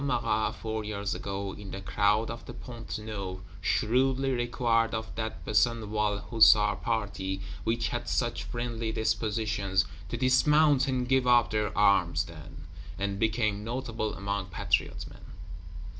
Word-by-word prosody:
Marat," 120 -5 0
four 110 -1 -4
years 100 -1 -3
ago, 100 -1 -4
in 100 -2 -9
the 95 - -6
crowd 105 +3 +1
of 115 - -8
the 120 - -8
Pont 120 -1 -7
Neuf, 100 -4 -5 0.2
shrewdly 130 +4 +1
required 120 -2 +1
of 110 0 -5
that 110 0 -5
Besenval 105 -2 +1
Hussar 110 -2 +6
party, 100 -5 -2 0.3
which 115 0 0
had - - -3
such - - -1
friendly 120 -2 -3
dispositions, 105 -3 0 0.2
"to 120 - -3
dismount, 145 +2 +4
and 125 -2 -1
give 130 -1 +2
up 120 -1 +5
their 105 -1 -1
arms, 85 -6 +4
then"; 80 -2 -11 0.3
and 100 0 -2
became 110 -2 0
notable 115 -2 -3
among 100 -1 -3
Patriot 95 - -1
men. - - -14
110 Hz, 140 wpm, -29 LUFS, 100-120 Hz, 0.3 s, Hussar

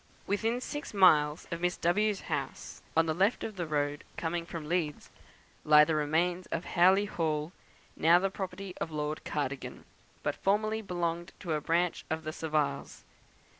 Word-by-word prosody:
Within 225 +4 0
six 290 -4 -6
miles 150 -5 +5
of 170 0 -3
Miss 180 0 0
W 210 +6 +2
's 200 - -6
house - - -5 0.2
on 165 - +5
the 160 - 0
left 195 +8 +1
of 215 - -5
the 175 -3 -3
road, 145 -1 -1
coming 170 0 -2
from 160 -4 -6
Leeds 160 -3 -2 0.5
lie 150 0 +7
the 160 - 0
remains 165 +4 0
of 165 - -3
Howley 190 +4 +4
Hall, 155 -4 -2 0.4
now 165 +3 +5
the 195 +2 0
property 190 0 -5
of - - -1
Lord 150 0 -3
Cardigan, 140 -2 -4 0.4
but - - 0
formerly 215 +2 +1
belonging 175 -3 -2
to 170 -5 -2
a 150 - -1
branch 170 +3 0
of 160 0 -2
the 155 - -4
Saviles. 155 -3 -2
170 Hz, 170 wpm, -30 LUFS, 155-190 Hz, 0.5 s, lie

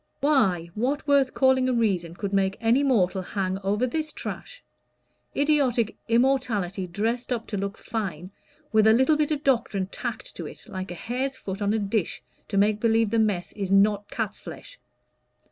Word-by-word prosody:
"Why, 190 - +2
what 275 +7 -1
worth 280 -2 +3
calling 260 -1 +3
a - - +1
reason 190 -8 0
could 200 +1 -4
make 195 0 +1
any 235 +4 +3
mortal 200 -9 +2
hang 190 0 -2
over 205 +5 +1
this 305 +5 -2
trash? - - -7 0.7
idiotic 275 -6 +2
immorality 230 -7 +1
dressed 225 +8 -2
up 230 -2 -1
to 205 - -2
look 200 +1 -3
fine, 185 -5 -4 0.4
with 215 0 +5
a 220 - +7
little 265 +6 +4
bit 300 -1 +1
of 300 -2 -2
doctrine 235 -8 +1
tacked 190 - -6
to - - -5
it, - - -12
like 185 0 -6
a 175 - -6
hare's 260 +7 -3
foot 195 -2 -6
on 205 0 +1
a 220 - +2
dish, 205 -2 -2 0.2
to 200 - -2
make 205 +1 +3
believe 225 -1 +2
the 230 - +2
mess 205 -5 0
is 195 -3 -4
not 200 +1 +3
cat's - - -3
flesh. - - -10
220 Hz, 180 wpm, -25 LUFS, 195-260 Hz, 0.7 s, a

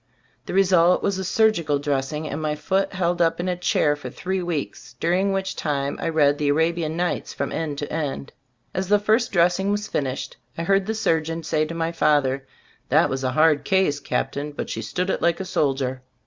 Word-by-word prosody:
The - - -4
result 180 -2 +4
was 200 -1 0
a - - -2
surgical 180 -7 +2
dressing 145 +2 -2
and 150 +1 -4
my 150 -1 -1
foot 190 +6 0
held 175 -2 0
up 165 0 +2
in 175 - -2
a 180 - 0
chair 155 -4 +1
for 145 -3 -8
three 190 +8 -3
weeks, 170 -5 -4
during 185 +4 +1
which 195 0 -2
time 140 -2 -2
I - - -1
read 145 -3 +3
the 150 - 0
"Arabian 160 +1 +1
Nights" 175 0 -2
from - - -2
end 155 -3 -3
to 145 - -5
end. 145 -3 -3 0.4
As 185 0 -2
the 205 +2 +5
first 215 +4 +1
dressing 180 +2 +2
was 205 +1 0
finished, 135 -2 -3 0.2
I 165 - -2
heard 195 +2 +2
the 220 - -1
surgeon 165 -6 0
say 155 -1 +1
to 165 +2 -6
my 165 0 -1
father: 140 -4 +1 0.4
"that - - +4
was 135 0 -2
a 130 0 0
hard 155 0 +4
case, 190 -7 +2
Captain, 145 +1 -3
but - - -5
she - - -3
stood 180 +1 -2
it - - -2
like 170 -1 +2
a 190 - -4
soldier." 135 -5 -1
165 Hz, 205 wpm, -23 LUFS, 145-185 Hz, 0.4 s, the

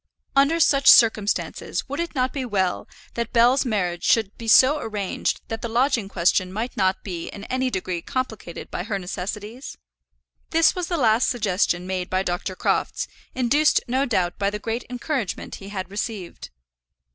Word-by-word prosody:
Under 280 +5 +4
such 275 -3 +3
circumstances 220 -3 +3
would 280 +3 -5
it 340 -2 -3
not 255 -1 0
be 275 - -3
well 195 -6 -1 0.3
that 235 0 -3
Bell's 245 +4 +4
marriage 180 -7 -1
should 220 -3 +2
be 230 - -9
so 265 +6 +6
arranged 205 -3 -2
that 225 0 -5
the 235 - -4
lodging 235 -3 +1
question 185 0 +1
might 225 +5 -4
not 190 0 +1
be 175 -4 -5
in 200 - -9
any 255 +3 -1
degree 185 -5 -3
complicated 220 -5 -5
by - - -3
her 200 +1 -3
necessities? 205 +6 -6 0.7
This 325 0 +4
was 360 -2 -3
the 345 - -1
last 225 -3 +3
suggestion 195 -6 0
made 185 -1 -3
by 185 0 0
Dr. 180 +1 -3
Crofts, - - -1 0.3
induced 270 +5 +3
no 260 +3 +1
doubt 180 -7 0
by 200 -1 +1
the 210 - -4
great 225 +3 -4
encouragement 250 - -3
he 195 - -9
had 190 -2 -5
received. 205 -3 -5
220 Hz, 170 wpm, -23 LUFS, 190-255 Hz, 0.7 s, so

